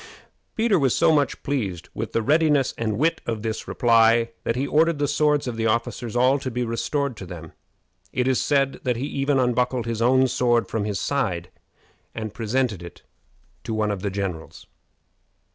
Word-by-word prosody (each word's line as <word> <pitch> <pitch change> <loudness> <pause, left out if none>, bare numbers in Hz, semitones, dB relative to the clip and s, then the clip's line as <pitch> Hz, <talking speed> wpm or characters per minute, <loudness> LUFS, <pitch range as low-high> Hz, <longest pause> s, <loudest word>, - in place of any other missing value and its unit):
Peter 220 -4 +2
was 135 -4 +2
so - - +4
much 145 -2 0
pleased 100 -12 -3
with 110 0 -4
the 115 - 0
readiness 150 -1 +3
and 110 -2 -2
wit 160 +4 +1
of 110 -2 -3
this 110 -1 -4
reply, 115 -1 +3
that 115 - -1
he 130 +3 -1
ordered 160 +2 +2
the 145 0 0
swords 150 0 +2
of 120 -3 -4
the 115 0 0
officers 115 +1 -2
all 130 +3 +3
to 130 - -4
be 125 0 -2
restored 135 +3 -2
to 100 - -9
them. 80 -3 -9 0.6
It 125 0 0
is 130 -1 +2
said 140 -2 +1
that 125 -2 0
he 130 - -3
even 140 -1 0
unbuckled 125 -1 +1
his 115 -1 -3
own 130 +2 +4
sword 120 -2 +1
from 110 -2 -2
his 105 -2 -2
side 95 -12 -2 0.6
and 110 -2 -5
presented 115 -3 -1
it 85 -2 -11 0.6
to 115 - -3
one 105 -1 0
of 100 -3 -4
the 100 - -1
generals. 95 -4 -5
120 Hz, 185 wpm, -23 LUFS, 110-140 Hz, 0.6 s, so